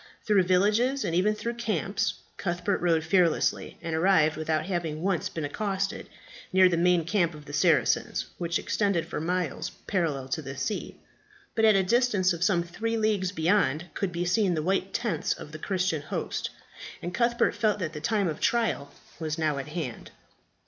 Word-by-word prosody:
Through 210 -2 +4
villages, 210 +9 +2
and 165 - -1
even 200 +5 +2
through 235 +2 -3
camps, 220 -2 -1 0.2
Cuthbert 180 +2 -1
rode 165 -2 +2
fearlessly, 170 -1 +1
and 165 -1 -2
arrived, 160 -3 +4
without 155 0 -1
having 170 -4 -3
once 190 -3 0
been 160 -3 -4
accosted, 195 +5 -2 0.4
near 185 0 +6
the 180 - +1
main 175 -1 +3
camp 175 -3 +1
of 150 -1 -12
the 145 - -10
Saracens, 145 - +2
which 170 0 0
extended 200 -6 0
for 165 - -4
miles 175 -2 -2 0.2
parallel 155 -8 -1
to 155 - -1
the 135 -2 -7
sea. 215 - -3 0.6
But 225 - +3
at 215 -2 +6
a 195 - +4
distance 205 -3 +2
of 170 0 -3
some 185 -3 +3
three 225 +7 -3
leagues 210 -4 +1
beyond, 170 -3 +1
could 195 -3 -2
be 175 0 -2
seen 185 0 +2
the 155 - -1
white 190 +2 0
tents 235 -3 -1
of 150 - -10
the 155 - -8
Christian 185 -3 -1
host, - - -3 0.5
and 175 - -5
Cuthbert 235 0 +2
felt 215 -2 +1
that 170 -5 -3
the 150 - -6
time 200 +3 +1
of 155 -2 -3
trial 225 -12 0 0.3
was 155 -1 -3
now 155 -3 0
at 135 - -6
hand. 150 -6 -5
180 Hz, 180 wpm, -27 LUFS, 160-205 Hz, 0.6 s, near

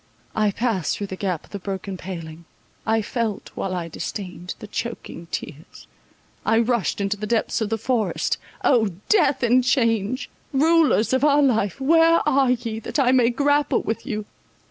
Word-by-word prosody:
I 215 -1 +3
passed 205 - -1
through 205 - -3
the 190 - -6
gap 185 -4 -2
of - - -23
the 200 - -5
broken 195 0 -5
paling—I 175 +5 -5
felt, 225 -2 -3
while 185 -1 -3
I 170 -2 -3
disdained, 180 +1 -6
the - - -9
choaking 205 -6 -6
tears—I 160 +7 -6
rushed 235 -3 +1
into 200 +1 -1
the 210 +1 -4
depths 230 +1 0
of 215 - -1
the 225 - 0
forest. 225 0 0 0.2
O 220 -8 +3 0.2
death 285 - +3
and 245 +2 +4
change, 230 -1 +1 0.3
rulers 300 -5 +3
of 260 +1 +2
our 290 0 +5
life, 220 -7 +1
where 330 +4 +4
are 270 -1 +3
ye, 235 -3 -1
that 225 - -5
I 260 -3 +4
may 250 -3 +4
grapple 290 +3 +2
with 225 - -3
you! 215 -5 -3
225 Hz, 165 wpm, -23 LUFS, 195-255 Hz, 0.3 s, our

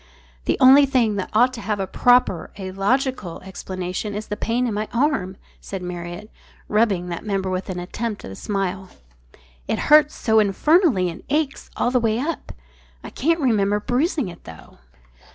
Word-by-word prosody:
"The - - +1
only 275 +2 +7
thing 235 -6 +1
that 190 - -3
ought 245 +4 +3
to 235 - -7
have 210 0 -2
a 195 - -1
proper, 245 -4 +2
a 190 -2 -6
logical, 205 -1 -1
explanation 185 +2 -5
is 210 +1 -4
the 210 - -2
pain 235 +3 -1
in 235 - -1
my 210 +1 -2
arm," 235 -8 0 0.2
said 195 -2 -7
Marriott, 175 +3 -7 0.4
rubbing 205 -5 +1
that 170 - -5
member 195 -3 -2
with 185 +1 -3
an 185 - -4
attempt 210 +4 -5
at - - -8
a - - -8
smile. 195 - -3 0.8
"It - - 0
hurts 300 0 +5
so 220 -1 +2
infernally 220 - +3
and 165 - -11
aches 290 -1 -1
all 240 - +1
the 250 - +3
way 225 -2 +1
up. 295 +5 -4 0.5
I - - -8
can't 330 +5 +1
remember 210 -5 +2
bruising 265 - 0
it, 170 -1 -11
though." 80 -5 -13
210 Hz, 175 wpm, -22 LUFS, 190-255 Hz, 0.8 s, only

